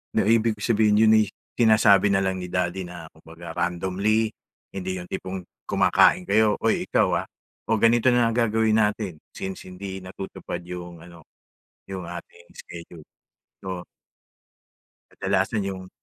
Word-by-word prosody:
Na -, -, +2 dB
ibig 115 Hz, 0 st, +3 dB
ko -, -, -13 dB
sabihin, 105 Hz, -2 st, +3 dB
yon 110 Hz, 0 st, +6 dB
ay -, -, +2 dB, 0.3 s
sinasabi 110 Hz, -4 st, +5 dB
na 100 Hz, -, +3 dB
lang 95 Hz, -1 st, -2 dB
ni 90 Hz, -, -6 dB
daddy 90 Hz, +1 st, -1 dB
na 90 Hz, -2 st, -8 dB
kumbaga 80 Hz, +1 st, -11 dB
randomly, 95 Hz, +6 st, 0 dB, 0.4 s
hindi 95 Hz, -1 st, -4 dB
yung 90 Hz, -, -7 dB
tipong 95 Hz, -1 st, -5 dB, 0.2 s
kumakain 90 Hz, -, +4 dB
kayo, 105 Hz, +2 st, +3 dB
"Oy -, -, +2 dB
ikaw -, -, +2 dB
ah, -, -, -11 dB, 0.4 s
o 110 Hz, -, +3 dB
ganito 115 Hz, +3 st, +4 dB
na 120 Hz, -1 st, +3 dB
ang 115 Hz, -, 0 dB
gagawin 110 Hz, -1 st, +2 dB
natin 105 Hz, -6 st, -2 dB
since 95 Hz, -1 st, -7 dB
hindi 95 Hz, +1 st, -7 dB
natutupad 95 Hz, -2 st, -7 dB
yung 90 Hz, -1 st, -8 dB
ano, 85 Hz, -1 st, -14 dB, 0.7 s
yung 95 Hz, -2 st, -5 dB
ating 85 Hz, 0 st, -10 dB
schedule." 85 Hz, -2 st, -11 dB, 0.6 s
So 90 Hz, -2 st, -5 dB, 1.3 s
Kadalasan 100 Hz, +2 st, 0 dB
yung, 95 Hz, -1 st, -6 dB
95 Hz, 145 wpm, -24 LUFS, 90-110 Hz, 1.3 s, yon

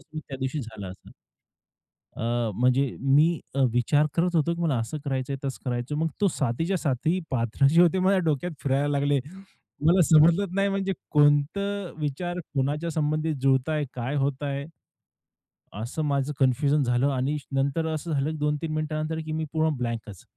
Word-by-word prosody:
त्यादिवशी 135 Hz, -1 st, -4 dB
झाला 110 Hz, -5 st, -8 dB
असत. 90 Hz, +1 st, -12 dB, 1.1 s
अ, -, -, -5 dB, 0.3 s
म्हणजे 125 Hz, +4 st, +2 dB
मी 150 Hz, +5 st, +3 dB
अ, 135 Hz, -, 0 dB
विचार 145 Hz, +5 st, +3 dB
करत 175 Hz, +1 st, +1 dB
होतो 165 Hz, +2 st, +2 dB
की 170 Hz, -, -7 dB
मला 150 Hz, -6 st, +1 dB
असं 115 Hz, +7 st, -3 dB
करायचंय, 135 Hz, -1 st, -2 dB
तसं 135 Hz, -, -4 dB
करायचंय, 125 Hz, +3 st, -2 dB
मग 160 Hz, +1 st, +1 dB
तो 200 Hz, -, +4 dB
सातीच्या 165 Hz, +7 st, -1 dB
साती 155 Hz, +5 st, 0 dB
पात्र 120 Hz, +1 st, +1 dB
जे 165 Hz, +5 st, +5 dB
होते 175 Hz, +2 st, +3 dB
माझ्या 190 Hz, +1 st, +3 dB
डोक्यात 160 Hz, +3 st, 0 dB
फिरायला 140 Hz, +1 st, +1 dB
लागले. 140 Hz, 0 st, +2 dB, 0.7 s
मला 180 Hz, +3 st, +5 dB
समजलच 165 Hz, +6 st, +5 dB
नाही 195 Hz, +1 st, +2 dB
म्हणजे 195 Hz, 0 st, -1 dB, 0.2 s
कोणतं 160 Hz, +7 st, +2 dB
विचार 175 Hz, +5 st, -3 dB, 0.2 s
कोणाच्या 145 Hz, +5 st, -1 dB
संबंधी 155 Hz, +1 st, 0 dB
जुळतंय, 135 Hz, +3 st, +2 dB
काय 130 Hz, +4 st, -3 dB
होतंय? 140 Hz, 0 st, -1 dB, 1.2 s
असं 120 Hz, +7 st, -4 dB
माझं 140 Hz, 0 st, 0 dB
कन्फ्युजन 140 Hz, +2 st, +3 dB
झालं 125 Hz, +2 st, +2 dB
आणि 135 Hz, +3 st, -1 dB, 0.2 s
नंतर 140 Hz, +4 st, 0 dB
असं 160 Hz, +1 st, -3 dB
झालं 140 Hz, +1 st, 0 dB
की 155 Hz, -, -5 dB
2-3 150 Hz, +2 st, -1 dB
मिनिटानंतर 155 Hz, +1 st, -2 dB
की 155 Hz, -, -5 dB
मी 155 Hz, 0 st, -2 dB
पूर्ण 160 Hz, -1 st, +1 dB
ब्लँकच. 115 Hz, -5 st, -5 dB
145 Hz, 155 wpm, -26 LUFS, 135-160 Hz, 1.2 s, जे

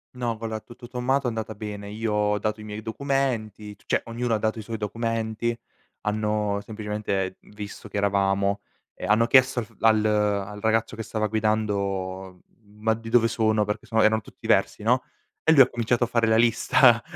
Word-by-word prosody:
No 120 Hz, -2 st, -2 dB
va 115 Hz, -, -6 dB
allora, 110 Hz, -1 st, -3 dB
tutto 120 Hz, +1 st, -13 dB
sommato 130 Hz, +2 st, 0 dB
è -, -, +2 dB
andata 110 Hz, -1 st, -4 dB
bene, 105 Hz, -1 st, -6 dB
io 110 Hz, +1 st, -2 dB
ho 105 Hz, 0 st, +2 dB
dato 110 Hz, +1 st, -2 dB
i -, -, -9 dB
miei 105 Hz, 0 st, -7 dB
documenti 110 Hz, -4 st, -2 dB
c -, -, -29 dB
cioè, -, -, +1 dB
ognuno 115 Hz, 0 st, -1 dB
ha -, -, +1 dB
dato 110 Hz, +1 st, -1 dB
i -, -, -4 dB
suoi 115 Hz, +1 st, -5 dB
documenti, 115 Hz, +1 st, -2 dB, 0.4 s
hanno 105 Hz, -1 st, 0 dB
semplicemente 105 Hz, -3 st, -3 dB
visto 105 Hz, +1 st, -10 dB
chi 105 Hz, -, -4 dB
eravamo 100 Hz, 0 st, +1 dB, 0.3 s
e -, -, -7 dB
hanno 110 Hz, +3 st, +4 dB
chiesto 130 Hz, +1 st, +5 dB
al -, -, -6 dB
f 115 Hz, -, -23 dB
al 110 Hz, -1 st, +4 dB
al 105 Hz, -1 st, 0 dB
ragazzo 110 Hz, 0 st, +1 dB
che 110 Hz, -, -5 dB
stava 110 Hz, 0 st, -2 dB
guidando: 100 Hz, -4 st, -1 dB, 0.2 s
"Ma 105 Hz, +1 st, -2 dB
di 115 Hz, 0 st, -7 dB
dove 115 Hz, 0 st, +4 dB
sono?" 110 Hz, -2 st, +1 dB
Perché 105 Hz, +1 st, -4 dB
sono 110 Hz, -1 st, +2 dB
erano 110 Hz, +1 st, +4 dB
tutti -, -, -16 dB
versi, -, -, +2 dB
no, 125 Hz, +3 st, +3 dB, 0.4 s
e 160 Hz, -, +4 dB
lui 150 Hz, -4 st, +8 dB
ha 130 Hz, -, +8 dB
cominciato 120 Hz, +1 st, 0 dB
a -, -, +1 dB
fare 115 Hz, -1 st, +1 dB
la 110 Hz, -, +4 dB
lista: 120 Hz, +1 st, +5 dB
110 Hz, 195 wpm, -25 LUFS, 105-115 Hz, 0.4 s, lui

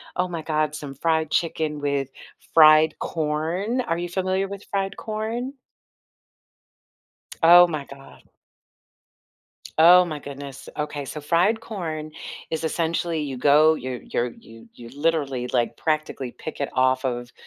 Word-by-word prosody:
"Oh 180 Hz, -, 0 dB
my 170 Hz, -2 st, -5 dB
god, 155 Hz, -1 st, -1 dB
some 145 Hz, -3 st, -7 dB
fried 160 Hz, +1 st, 0 dB
chicken 155 Hz, -3 st, -1 dB
with 140 Hz, -2 st, -1 dB, 0.4 s
fried 155 Hz, 0 st, +6 dB
corn." 165 Hz, +9 st, -2 dB
Are 165 Hz, -8 st, -2 dB
you 175 Hz, 0 st, -4 dB
familiar 190 Hz, +1 st, -1 dB
with 200 Hz, 0 st, -8 dB
fried 195 Hz, 0 st, -3 dB
corn? 225 Hz, +4 st, -4 dB, 1.9 s
Oh, 175 Hz, +2 st, +9 dB
my 155 Hz, -5 st, -4 dB
god. 135 Hz, 0 st, -15 dB, 1.5 s
Oh, 180 Hz, +3 st, +8 dB
my 155 Hz, -4 st, -5 dB
goodness, 140 Hz, -1 st, -9 dB
okay, 150 Hz, -1 st, -3 dB
so 150 Hz, +3 st, -7 dB
fried 175 Hz, +9 st, +2 dB
corn 160 Hz, -9 st, -5 dB, 0.4 s
is 160 Hz, 0 st, -2 dB
essentially, 165 Hz, 0 st, -1 dB
you 140 Hz, -3 st, -4 dB
go 150 Hz, +4 st, +5 dB
you're 130 Hz, -3 st, -5 dB
you're 120 Hz, -, -2 dB
you 115 Hz, 0 st, -16 dB
you 120 Hz, -1 st, -12 dB
literally, 140 Hz, -4 st, -1 dB
like, 120 Hz, -2 st, 0 dB
practically 155 Hz, -5 st, -2 dB
pick 155 Hz, -, -7 dB
it 140 Hz, -, -1 dB
off 130 Hz, +1 st, +2 dB
of, 120 Hz, -1 st, -3 dB
155 Hz, 135 wpm, -23 LUFS, 140-175 Hz, 1.9 s, Oh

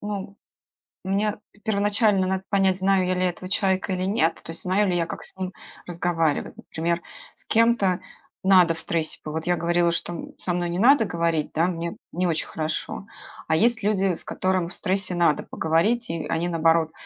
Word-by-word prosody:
ну, 200 Hz, -1 st, -5 dB, 0.7 s
мне 205 Hz, +2 st, 0 dB, 0.2 s
первоначально 205 Hz, -2 st, +2 dB
надо 190 Hz, 0 st, -1 dB
понять, 195 Hz, -2 st, +3 dB
знаю 190 Hz, -1 st, +2 dB
я 185 Hz, -, +1 dB
ли 180 Hz, -, -1 dB
этого 180 Hz, 0 st, -2 dB
человека 190 Hz, -1 st, +1 dB
или 185 Hz, 0 st, -2 dB
нет. 195 Hz, -4 st, +1 dB
То 165 Hz, -, -7 dB
есть 165 Hz, -, -5 dB
знаю 190 Hz, +2 st, +2 dB
ли 175 Hz, -, +1 dB
я, 170 Hz, -, +1 dB
как -, -, -7 dB
с -, -, -8 dB
ним 185 Hz, 0 st, -4 dB, 0.3 s
разговаривать. 165 Hz, -3 st, -1 dB
Например, 170 Hz, +1 st, -2 dB, 0.3 s
с -, -, -10 dB
кем-то 225 Hz, -5 st, +3 dB, 0.4 s
надо 185 Hz, -3 st, +6 dB
в 160 Hz, -, -5 dB
стрессе 160 Hz, -1 st, -1 dB
по 150 Hz, -, -5 dB
Вот 160 Hz, +1 st, -4 dB
я 175 Hz, -, +3 dB
говорила, 170 Hz, 0 st, +1 dB
что 175 Hz, -, -2 dB
м 170 Hz, -, -8 dB
со 180 Hz, -, -1 dB
мной 175 Hz, 0 st, -1 dB
не 175 Hz, -, -2 dB
надо 245 Hz, 0 st, +6 dB
говорить, 170 Hz, -3 st, -1 dB
да, 165 Hz, +3 st, +2 dB
мне 170 Hz, -1 st, -3 dB, 0.2 s
не 180 Hz, +1 st, 0 dB
очень 160 Hz, -2 st, -1 dB
хорошо. 155 Hz, +5 st, -4 dB, 0.4 s
А 160 Hz, -, +2 dB
есть 230 Hz, +4 st, +3 dB
люди, 195 Hz, -3 st, +2 dB
с -, -, -5 dB
которым 185 Hz, -2 st, 0 dB
в 175 Hz, -, -9 dB
стрессе 190 Hz, -1 st, 0 dB
надо 170 Hz, -3 st, +2 dB
поговорить, 205 Hz, +10 st, +1 dB
и 165 Hz, -1 st, -3 dB
они 170 Hz, +2 st, -1 dB
наоборот, 165 Hz, -1 st, +2 dB
180 Hz, 195 wpm, -24 LUFS, 170-195 Hz, 0.7 s, надо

